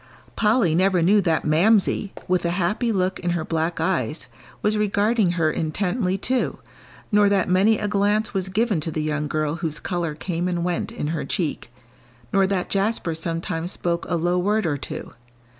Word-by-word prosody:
Polly 210 -6 +3
never 185 0 +3
knew 205 +4 +5
that 165 -3 0
Mamsie, 195 +5 +3 0.2
with 180 0 +1
a 170 - +1
happy 210 +6 0
look 185 -2 0
in 175 - -2
her 160 - -3
black 165 +1 -1
eyes, 160 -5 -1 0.4
was 210 +1 +2
regarding 210 -1 +2
her 160 -3 +1
intently, 185 +4 -1
too, 255 +6 -1 0.5
nor 205 -1 +5
that 200 -2 +2
many 195 +4 +4
a 210 - -2
glance 205 +1 +1
was 190 -1 -2
given 210 -1 +1
to 155 - -3
the 155 -1 -2
young 150 -1 -1
girl 155 +1 -1
whose 160 -3 -3
colour 170 -4 -3
came 175 +2 -2
and 175 -1 -1
went 175 0 -2
in 150 - -3
her 160 -1 -2
cheek, 155 - -3 0.6
nor 195 -1 +4
that 190 -2 -1
Jasper 195 -3 0
sometimes 165 +1 -3
spoke 170 -1 -2
a 175 - +1
low 175 +2 +1
word 210 +3 +1
or 155 -3 +1
two. 140 - -7
180 Hz, 180 wpm, -23 LUFS, 165-205 Hz, 0.6 s, knew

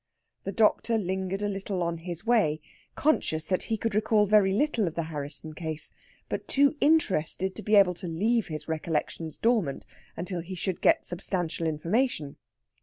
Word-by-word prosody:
The 195 - -2
doctor 225 +2 +2
lingered 190 0 -2
a - - +1
little 195 -2 -2
on 170 -1 -2
his 175 +3 -5
way, 210 -11 +3 0.4
conscious 160 - +1
that 185 +1 +1
he 220 - +1
could 225 0 -2
recall 215 0 +3
very 205 -1 +4
little 230 -2 +1
of 165 - -4
the 170 - -1
Harrisson 150 +2 -5
case, 160 -1 -5 0.3
but - - -4
too 280 +1 +3
interested 190 - +2
to 215 - -8
be 215 0 +2
able 195 -3 +6
to 175 +1 -7
leave 215 +7 +1
his 155 -2 -6
recollections 160 0 -3
dormant 220 - +1 0.3
until 180 +1 -3
he 185 +3 -7
should 185 +1 -3
get - - +4
substantial 175 -2 -2
information. 160 - -1
185 Hz, 170 wpm, -28 LUFS, 165-215 Hz, 0.4 s, able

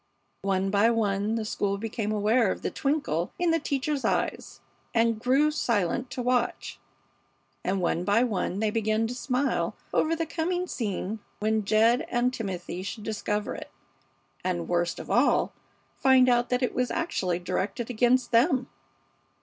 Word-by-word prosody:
One 195 0 0
by 205 +3 +4
one 210 -1 0
the 225 -1 -2
school 200 -2 -1
became 215 0 -3
aware 215 0 +2
of - - -5
the - - -1
twinkle 275 - -1
in 350 -1 +2
the 330 - +2
teacher's 285 -1 -2
eyes, - - -1 0.4
and 230 -1 +3
grew 270 +6 +3
silent 235 - 0
to 255 -1 -4
watch, 250 -1 -1 0.8
and 190 +1 0
one 175 -1 0
by 205 +5 +3
one 200 -4 -1
they 215 -1 +1
began 220 0 +1
to 230 - -3
smile 255 +2 -1 0.2
over 325 +1 +2
the 330 0 -1
coming 350 +3 -1
scene 215 - -3 0.2
when 215 0 0
Jed 225 +4 +3
and 245 +1 +1
Timothy 185 -6 -4
should 205 +3 -6
discover 210 -1 -2
it, - - -8 0.7
and, 175 -2 -2
worst 175 0 0
of - - -7
all, - - +3 0.5
find 260 -1 +5
out 245 0 +3
that 250 +1 +1
it 250 - 0
was 250 -1 0
actually 190 - -1
directed 190 +7 -3
against 245 +2 +2
them. 255 +2 +3
225 Hz, 160 wpm, -27 LUFS, 200-255 Hz, 0.8 s, find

